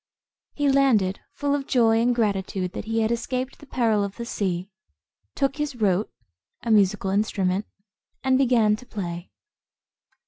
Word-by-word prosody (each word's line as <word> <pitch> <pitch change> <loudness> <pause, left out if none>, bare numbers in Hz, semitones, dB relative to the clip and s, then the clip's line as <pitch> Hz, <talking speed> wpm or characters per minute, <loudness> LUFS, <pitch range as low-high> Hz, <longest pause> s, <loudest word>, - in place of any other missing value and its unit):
He 290 -1 +1
landed, 255 -9 +3 0.2
full 285 -1 0
of 280 -1 -2
joy 225 -2 +3
and 245 +1 +2
gratitude 195 -4 -1
that - - -5
he 225 0 0
had 220 +1 +1
escaped 255 +2 -3
the 290 - -14
peril 225 -6 +1
of 200 -1 -4
the 235 - -6
sea; 190 -3 -2 0.6
took 275 0 0
his 295 -3 -2
rote,[Footnote: 205 -3 +1 0.5
A 230 - -1
musical 200 -2 +3
instrument.] 195 -1 0 0.6
and 265 0 +3
began 240 -5 +4
to 250 - -13
play. 175 -4 -5
225 Hz, 150 wpm, -24 LUFS, 195-255 Hz, 0.6 s, began